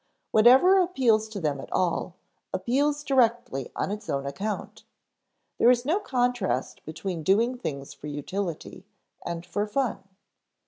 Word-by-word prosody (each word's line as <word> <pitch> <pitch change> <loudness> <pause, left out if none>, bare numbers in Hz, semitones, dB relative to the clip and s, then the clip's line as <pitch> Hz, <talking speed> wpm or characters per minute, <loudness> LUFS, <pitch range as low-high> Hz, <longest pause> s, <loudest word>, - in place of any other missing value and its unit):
Whatever 265 - +6
appeals 240 -12 +2
to 215 -2 -6
them 150 -5 -1
at - - -9
all, 180 0 -1 0.4
appeals 285 +9 0
directly 235 - +1
on - - -2
its 210 +1 -6
own 140 0 -1
account. 195 +10 -5 0.8
There 235 - +6
is 245 0 +3
no 330 +8 +2
contrast 245 - -1
between 160 +2 -5
doing 225 +9 +2
things 140 - -6
for 145 +1 -10
utility 175 +5 -5 0.4
and 170 0 -5
for 205 +4 -2
fun. 250 +2 -1
210 Hz, 135 wpm, -26 LUFS, 165-250 Hz, 0.8 s, Whatever